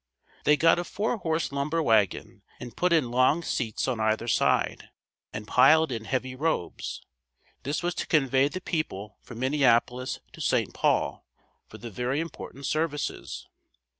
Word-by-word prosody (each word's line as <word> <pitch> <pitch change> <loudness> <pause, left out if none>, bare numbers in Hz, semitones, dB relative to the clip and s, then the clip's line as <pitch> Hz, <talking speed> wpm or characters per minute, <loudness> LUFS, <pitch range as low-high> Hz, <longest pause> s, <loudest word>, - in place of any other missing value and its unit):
They 150 0 +5
got 165 +2 +4
a - - -1
four 215 +6 -2
horse 160 -5 -1
lumber 150 +4 -1
wagon 110 - +1 0.2
and 120 -1 -9
put 180 0 +1
in 155 -8 +2
long 130 +7 +3
seats 115 -6 -2
on 125 -4 -1
either 110 +1 0
side, 115 - +1 0.4
and 105 0 -7
piled 160 +6 +5
in 115 -2 -4
heavy 130 +1 -2
robes. 135 - -3 0.6
This 145 +5 -3
was 175 0 0
to - - -4
convey 135 -3 +3
the 185 +5 -6
people 105 - -4
from 120 - -11
Minneapolis 130 -1 +1
to - - -10
St. - - +1
Paul - - 0 0.4
for - - -12
the 120 -1 -8
very 125 +7 -1
important 150 -4 -7
services. 155 0 -3
135 Hz, 155 wpm, -27 LUFS, 120-160 Hz, 0.6 s, They